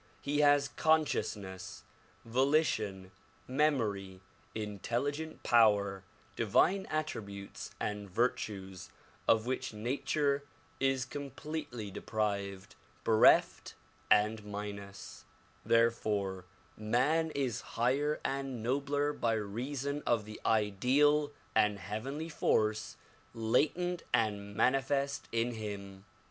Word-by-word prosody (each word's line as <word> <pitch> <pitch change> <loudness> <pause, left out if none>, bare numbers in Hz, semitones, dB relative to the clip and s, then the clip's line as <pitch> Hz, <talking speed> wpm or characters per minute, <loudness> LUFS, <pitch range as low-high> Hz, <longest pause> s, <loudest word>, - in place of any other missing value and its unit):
He 145 +1 0
has 145 -1 +5
conscious 160 -5 +2
ness, 95 -2 -9 0.4
volition, 115 -7 +1 0.4
memory, 110 -10 0 0.3
intelligent 120 - -3
power, 100 -4 +4 0.3
divine 175 - +2
attributes 100 -11 -4
and 105 -1 -3
vir 120 +7 +3
tues 95 -5 -7 0.4
of 110 0 +4
which 130 -3 -3
nature 140 +5 0 0.4
is 135 -1 +1
completely 140 -5 -6
deprived, 100 -2 -3 0.3
bereft 110 -1 +4 0.3
and 105 +1 +3
minus; 100 -1 -7 0.4
therefore 105 -5 +1 0.3
man 130 +10 +1
is 130 -6 -1
higher 140 +6 0
and 135 -4 -2
nobler 145 +3 0
l3y 110 -5 -1
reason 140 +4 -3
of 115 -3 +2
the 110 0 -9
ideal 130 +8 +3 0.2
and 105 -1 +3
heav 105 +4 -5
enly 155 +4 -4
force 110 -6 +1 0.4
latent 155 +10 +1
and 100 -2 -1
manifest 135 +3 +1
in 115 +1 +1
him. 100 -3 -7
115 Hz, 95 wpm, -32 LUFS, 105-140 Hz, 0.4 s, has